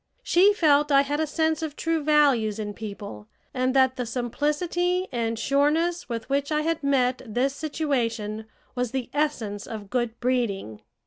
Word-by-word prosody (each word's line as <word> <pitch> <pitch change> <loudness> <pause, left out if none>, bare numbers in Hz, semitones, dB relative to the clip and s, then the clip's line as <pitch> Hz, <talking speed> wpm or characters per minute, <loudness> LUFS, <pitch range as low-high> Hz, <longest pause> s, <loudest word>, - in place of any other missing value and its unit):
She 390 -2 +5
felt 295 -6 +3
I 275 0 +6
had 290 +2 -2
a 315 - 0
sense 320 +1 0
of 310 -2 -4
true 330 -2 -1
values 275 -8 +3
in 210 -1 -4
people, 200 - -8 0.3
and 255 0 0
that 260 -1 +4
the 250 -2 -3
simplicity 305 +9 -1
and 230 -2 -1
sureness 300 +8 +1
with 230 -2 -4
which 280 +2 -1
I 300 0 +2
had 325 +1 -1
met 260 -3 +1
this 255 +4 -1
situation 230 -9 -2 0.3
was 250 -2 -2
the 260 -3 -3
essence 245 -9 -2
of 210 -3 -8
good 240 -2 -1
breeding. 225 - -1
265 Hz, 165 wpm, -25 LUFS, 230-300 Hz, 0.3 s, I